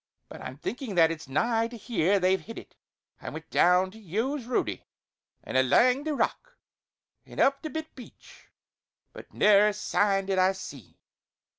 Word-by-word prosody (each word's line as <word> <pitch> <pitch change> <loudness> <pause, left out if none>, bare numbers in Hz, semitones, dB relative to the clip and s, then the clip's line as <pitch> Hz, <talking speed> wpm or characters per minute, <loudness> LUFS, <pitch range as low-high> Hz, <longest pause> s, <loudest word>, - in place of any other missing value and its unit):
But - - -10
I'm 130 - -8
thinkin' 235 - -5
that 165 -1 +5
it's 160 -3 -7
nigh 225 - 0
to 235 0 -10
here 205 -3 +1
they've 185 +1 +2
hid 230 - -10
it; - - -12 0.5
I - - -6
went - - -10
down 180 +1 +3
the 220 - -14
yowes' 225 - -3
roadie, 250 - -2 0.6
an' - - -7
alang 250 - +3
the 310 -2 -1
rock, - - -3 0.7
an' - - -11
up 275 0 +3
the 315 - -5
bit 315 0 -6
beach; 250 - -15 0.6
but - - -12
never 210 0 +5
a 210 - 0
sign 200 -1 0
did 190 -1 0
I 185 +1 +3
see. 145 - -11
210 Hz, 170 wpm, -27 LUFS, 185-250 Hz, 0.7 s, that